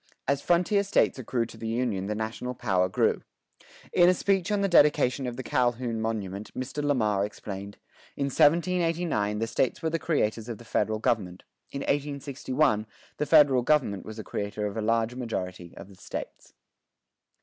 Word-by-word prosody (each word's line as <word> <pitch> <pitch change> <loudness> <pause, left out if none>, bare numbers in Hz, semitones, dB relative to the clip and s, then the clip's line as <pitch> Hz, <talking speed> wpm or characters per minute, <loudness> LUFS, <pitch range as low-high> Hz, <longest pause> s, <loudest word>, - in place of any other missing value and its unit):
As 140 0 +1
frontier 180 +5 +2
States 200 -8 +1
accrued 120 -1 -2
to - - -12
the 115 - -5
Union 110 -5 -1
the 105 - -2
national 110 +3 -4
power 95 -5 +1
grew. - - +1 0.7
In 175 0 +6
a 180 - +4
speech 195 +1 +1
on 205 -1 +1
the 200 - +2
dedication 145 -6 +4
of 120 - -5
the 130 - -4
Calhoun 120 -2 0
monument 105 -2 -4
Mr. 130 +3 -4
Lamar 110 -9 +1
explained: 100 -1 -6 0.4
"In 140 - 0
1789 165 - +2
the 115 - 0
States 125 +5 -1
were 160 - 0
the 165 - 0
creators 115 -3 -1
of 115 - -4
the 120 - -14
Federal 110 -1 0
Government; 95 -5 -1 0.3
in 140 - -5
1861 140 -5 0 0.3
the 150 - -1
Federal 145 -5 +6
Government 125 -8 +1
was 110 0 -9
the 110 - -5
creator 105 +1 -4
of 105 0 -4
a 110 - -2
large 115 +1 +1
majority 90 -8 -5
of - - -9
the 100 - -15
States." - - -8
120 Hz, 170 wpm, -27 LUFS, 105-145 Hz, 0.7 s, In